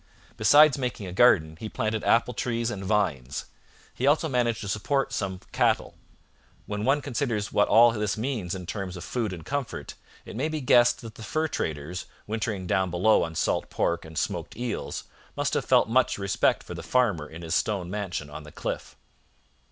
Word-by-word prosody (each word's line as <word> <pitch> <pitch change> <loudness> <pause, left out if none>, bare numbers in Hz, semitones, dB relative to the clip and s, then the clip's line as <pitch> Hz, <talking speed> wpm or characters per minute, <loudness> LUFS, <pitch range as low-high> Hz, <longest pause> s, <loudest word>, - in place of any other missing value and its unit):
Besides 145 +6 +6
making 125 -6 -3
a 90 - -6
garden, 80 -8 +4
he 110 +4 -6
planted 110 0 -2
apple 120 +1 +3
trees 115 0 -1
and 100 -4 -5
vines. 90 - -1 0.5
He 130 - -1
also 155 +3 +3
managed 120 -4 0
to 105 - -5
support 135 +7 0
some 95 -4 -3
cattle. - - +1 0.7
When 105 0 -4
one 140 +2 +2
considers 120 -7 -2
what 105 - +4
all 120 +1 +7
this 105 -2 -1
means 110 -7 -2
in 90 -1 -7
terms 95 -1 -5
of 90 - -7
food 115 -5 -2
and 85 -4 -8
comfort, 140 +3 -4 0.3
it - - -9
may 140 +7 -1
be 155 -1 -2
guessed 120 -3 +4
that 115 -2 -9
the - - -13
fur 155 +8 0
traders, 80 - -4 0.2
wintering 105 -3 -3
down 95 +1 +1
below 90 +5 +3
on 80 0 -3
salt - - 0
pork 85 0 0
and 80 -1 -10
smoked - - -3
eels, 120 0 -3 0.3
must - - 0
have - - 0
felt - - +4
much 130 +3 +2
respect 100 -1 +1
for - - -8
the - - -6
farmer 105 -12 +1
in 80 +2 -9
his 80 0 -3
stone 95 -2 0
mansion 95 -7 -3
on 75 +1 -8
the 75 0 -12
cliff. - - -5
105 Hz, 190 wpm, -27 LUFS, 90-120 Hz, 0.7 s, all